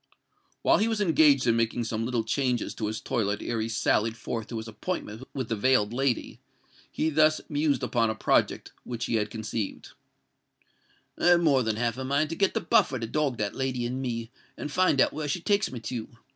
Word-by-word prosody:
While - - +4
he 215 - +2
was 225 -2 -1
engaged 155 -8 +4
in 115 -2 +3
making 115 +1 0
some 115 0 -2
little 120 -2 0
changes 125 0 -1
in 110 - -3
his 110 +1 -3
toilet 105 -2 -1
ere 115 -2 -2
he 110 - -2
sallied 115 -1 +1
forth 115 0 -4
to 115 - -5
his 110 0 -6
appointment 115 - -5
with 130 -4 -2
the 115 - -1
veiled 110 -1 +2
lady, 135 -1 -1 0.5
he 160 - 0
thus 155 +1 +4
mused 145 -2 +1
upon 115 -2 +1
a 110 - -2
project - - +1
which 115 -2 -4
he 115 - 0
had 105 -1 -1
conceived:— 110 -1 -4 1.3
"I - - +2
have 175 -1 +6
more 140 -6 +4
than 110 -3 0
half 120 +2 -1
a - - -3
mind 140 +4 0
to - - -2
get 195 +1 +1
the - - +1
Buffer 210 - +3
to 115 - -3
dog 140 +1 -1
that 105 -1 -2
lady 130 -2 -2
and 125 +2 -3
me, 115 -2 -4 0.3
and 150 - -5
find 180 -4 +3
out - - +4
where 150 -1 -3
she 150 +5 -1
takes 205 +4 +1
me 125 - -6
to. 115 0 -4
125 Hz, 215 wpm, -27 LUFS, 115-145 Hz, 1.3 s, have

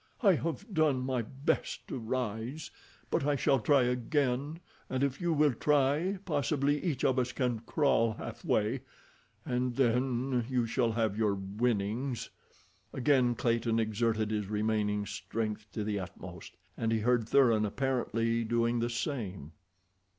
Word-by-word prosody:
"I 200 -3 +7
have 165 +4 -2
done 155 -6 +2
my 130 -1 -1
best 135 +5 -2
to 130 - -3
rise, 120 +4 -3 0.4
but - - +1
I 145 0 +2
shall 140 -1 +2
try 135 +4 +4
again, 130 +4 0 0.3
and 130 +1 0
if 135 -1 -1
you 175 -1 +1
will 150 -3 +3
try 150 - +2
possibly 145 -2 0
each 155 -8 -1
of 130 0 +3
us 125 0 0
can 125 -3 -1
crawl 115 -7 +2
halfway, 110 +4 -1 0.6
and 125 0 -1
then 125 0 +1
you 125 -3 +1
shall 115 0 +1
have 110 -2 0
your 105 -3 +2
'winnings.'" 110 +5 -2 0.6
Again 130 -2 +2
Clayton 115 -1 +1
exerted 110 -1 0
his 105 -2 -1
remaining 105 -1 0
strength 105 +1 -4
to 105 - -2
the 105 -1 -1
utmost, 90 -2 -9 0.2
and 115 0 -1
he 110 -1 +1
heard 120 -1 +2
Thuran 120 -6 +4
apparently 115 -1 0
doing 115 +1 +1
the 120 +1 0
same. 105 - -4
120 Hz, 145 wpm, -31 LUFS, 110-135 Hz, 0.6 s, I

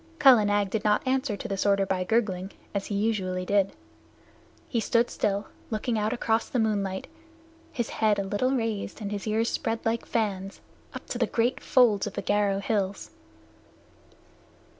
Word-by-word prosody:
Kala 255 -8 +7
Nag 205 -1 +1
did 220 -1 -1
not 210 +3 +2
answer 260 -5 0
to - - -6
the 195 -1 -1
order 200 -1 +3
by 185 -1 -1
gurgling, 195 -2 0 0.2
as 200 -1 -2
he 205 - -3
usually 190 -4 -1
did. 200 0 +2 1.0
He 235 - -1
stood 235 +1 +2
still, 200 0 -1 0.2
looking 225 +2 -1
out 210 +1 0
across 230 -2 0
the - - -1
moonlight, 200 -4 0 0.7
his 240 -6 -2
head 215 -2 +2
a 200 - 0
little 205 +6 0
raised 225 -5 -2
and 205 -2 -4
his 205 +1 -4
ears 220 +2 +1
spread 225 0 -1
like 230 +1 -1
fans, 195 -3 -2 0.4
up - - -7
to - - -3
the - - +2
great 240 +2 0
folds 225 -6 +4
of 205 - -6
the - - -4
Garo 205 -1 +1
hills. 200 -3 -1
210 Hz, 170 wpm, -27 LUFS, 195-225 Hz, 1.0 s, Kala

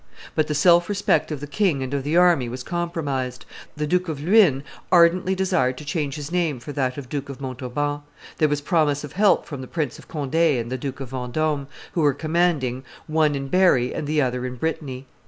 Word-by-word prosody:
But 155 -1 +1
the 150 - -2
self 175 +4 +5
respect 195 -6 +1
of 150 -3 -4
the - - -4
king 150 -3 0
and 130 +1 -5
of 140 -1 -1
the 150 +4 +1
army 175 -9 +4
was 125 +1 -6
compromised; 145 -8 -3 0.3
the 150 - -1
Duke 180 +3 0
of 150 -3 -4
Luynes 165 -5 +4 0.3
ardently 180 +2 +4
desired 130 -9 +1
to 150 - -9
change 145 -2 -2
his 150 0 -6
name 170 -7 0
for 120 - -8
that 130 -2 -1
of 140 -3 -7
Duke 140 +1 -4
of 140 - -7
Montauban; 135 +2 -3 0.4
there 155 - +4
was 145 0 -1
promise 145 -2 +1
of 150 - -8
help 205 +1 +3
from 140 -4 -7
the 130 - -8
Prince 150 -4 -3
of - - -15
Conde 145 -3 -5
and 145 -8 +2
the 130 - -1
Duke 135 -1 -5
of 130 - -6
Vendome, 140 +3 -2 0.2
who 170 - -1
were 145 -3 +3
commanding, 155 -6 0 0.2
one 155 -2 +2
in 135 0 -4
Berry 155 -8 +3
and 145 - -4
the 150 -1 +2
other 125 -1 -2
in 125 0 -4
Brittany. 135 -2 -4
145 Hz, 215 wpm, -23 LUFS, 130-165 Hz, 0.4 s, self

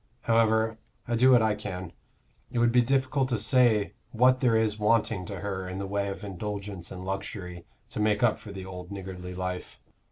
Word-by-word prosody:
However, 110 -1 +2 0.3
I 120 - 0
do 125 +3 +5
what 125 -3 +6
I 110 -1 +3
can; 95 -4 -6 0.6
it - - -4
would 120 0 +4
be 125 +1 +5
difficult 130 +1 +1
to 120 - +1
say 110 -3 +3 0.2
what 130 +2 +4
there 125 -3 +3
is 110 -1 +1
wanting 105 -3 +2
to 100 -3 -6
her 95 -2 -3
in 90 - -5
the 100 - -3
way 100 +1 -1
of 100 +2 -5
indulgence 100 -1 -5
and 90 0 -7
luxury 95 -2 -5 0.3
to - - -5
make 105 +1 +2
up 120 - +3
for 105 - -10
the 95 -2 -7
old 90 -1 -8
niggardly 90 -2 -7
life." 90 0 -5
105 Hz, 195 wpm, -28 LUFS, 95-115 Hz, 0.6 s, what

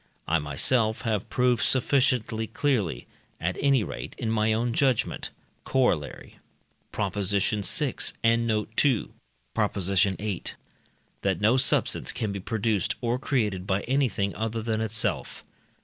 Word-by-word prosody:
I 85 +1 +2
myself 110 - +1
have 110 -5 -2
proved 125 -3 +2
sufficiently 125 -1 +1
clearly, 110 - -1 0.3
at 90 +2 -1
any 135 -4 +3
rate - - -6
in 110 - -2
my 110 0 +2
own 115 +2 0
judgment 130 -2 0 0.3
(Coroll. 125 - 0 0.6
Prop. 100 -3 -2
vi, 105 +7 0 0.3
and 115 +1 +3
note 105 -2 0
2, 135 -7 +2 0.4
Prop. - - 0
viii.), 95 +1 +1 0.8
that 95 -3 0
no 110 +4 +4
substance 130 - +2
can 110 -4 -3
be 100 - -4
produced 105 -1 -1
or 120 +1 -1
created 105 -9 -1
by 95 +1 +1
anything 120 -7 0
other 115 0 -3
than 110 -1 -1
itself. 110 0 -1
110 Hz, 130 wpm, -26 LUFS, 100-120 Hz, 0.8 s, no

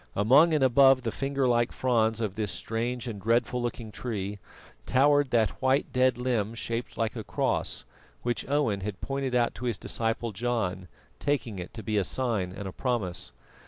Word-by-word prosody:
Among 135 - +6
and 150 -3 +2
above 135 0 +6
the 115 - -1
finger 135 +1 0
like 120 -1 +2
fronds 115 -3 +1
of 105 -4 -1
this 105 -1 -2
strange 120 +4 -3
and 105 -4 -5
dreadful 120 +3 +1
looking 120 -2 -4
tree 100 -2 -4 0.5
towered 145 +1 +4
that 115 -3 +1
white 130 +1 +2
dead 130 -1 +3
limb 115 -3 -1
shaped 115 +1 -4
like 115 0 -1
a 110 - -4
cross, 60 - -1 0.4
which 120 +2 -2
Owen 140 -9 +1
had 100 -1 -5
pointed 135 -2 -2
out 120 -1 +2
to 125 - -7
his 120 -4 0
disciple 115 0 -2
John, 95 -4 -2 0.3
taking 125 -8 -1
it 90 - -7
to 110 - -7
be 110 -2 -1
a - - +1
sign 110 -5 -1
and 95 +1 -6
a - - -5
promise. 95 -8 -2
120 Hz, 180 wpm, -28 LUFS, 105-130 Hz, 0.5 s, Among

